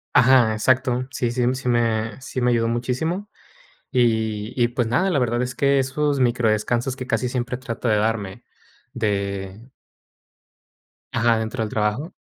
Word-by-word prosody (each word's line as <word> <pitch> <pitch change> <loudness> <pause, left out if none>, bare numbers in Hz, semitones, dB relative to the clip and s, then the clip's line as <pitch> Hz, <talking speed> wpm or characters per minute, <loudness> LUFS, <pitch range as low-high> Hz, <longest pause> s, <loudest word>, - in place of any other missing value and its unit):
Ajá, 125 -3 +6
exacto. 125 +2 +1
Sí, 120 -3 -2
sí, 125 0 -1
sí 125 -1 -6
me 115 -1 0
sí 130 - -5
me 125 0 +2
ayudó 115 -1 +2
muchísimo, 130 - -2 0.7
y 110 -3 +1
y 120 - +5
pues, 120 -2 -1
nada, 175 +12 +2
la 150 -7 +1
verdad 120 -1 0
es 125 +1 -3
que 140 0 +2
esos 140 +2 0
micro 120 -2 +2
descansos 120 +4 0
que 130 -1 -6
casi 115 +1 0
siempre 125 -1 -2
trato 125 -1 -5
de 110 - +3
darme 105 -3 -2 0.5
de 100 0 -3 1.4
Ajá, 115 0 +2
dentro 110 +2 -3
del 110 - -3
trabajo. 105 - -1
120 Hz, 155 wpm, -22 LUFS, 110-130 Hz, 1.4 s, Ajá